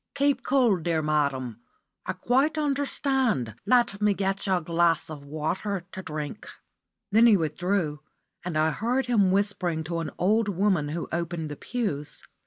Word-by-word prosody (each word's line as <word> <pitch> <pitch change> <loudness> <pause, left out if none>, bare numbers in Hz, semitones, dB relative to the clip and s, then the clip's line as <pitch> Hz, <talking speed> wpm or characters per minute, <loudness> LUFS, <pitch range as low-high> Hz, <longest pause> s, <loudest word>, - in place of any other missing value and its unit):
"Keep 280 -2 +2
cool, 245 -6 +3
dear 165 -1 -1
madam. 140 -6 0 0.5
I - - -1
quite 275 +6 +1
understand. 270 - 0
Let 240 -5 +3
me 210 -1 +3
get 195 +1 -2
you 190 - +3
a 180 - 0
glass 165 0 +1
of 145 -2 -8
water 170 +6 -3
to 190 - -6
drink." 155 +2 -6 0.6
Then 225 +3 +6
he 215 -3 +6
withdrew, 165 -1 -1 0.4
and 175 -3 -3
I 155 +1 +3
heard 245 +9 0
him 210 -6 +3
whispering 185 -5 0
to 165 +2 -3
an 165 - -3
old 210 +3 +2
woman 185 -6 +1
who 165 +3 -4
opened 170 -2 -3
the - - -5
pews. 155 - -4
185 Hz, 160 wpm, -26 LUFS, 155-225 Hz, 0.6 s, Then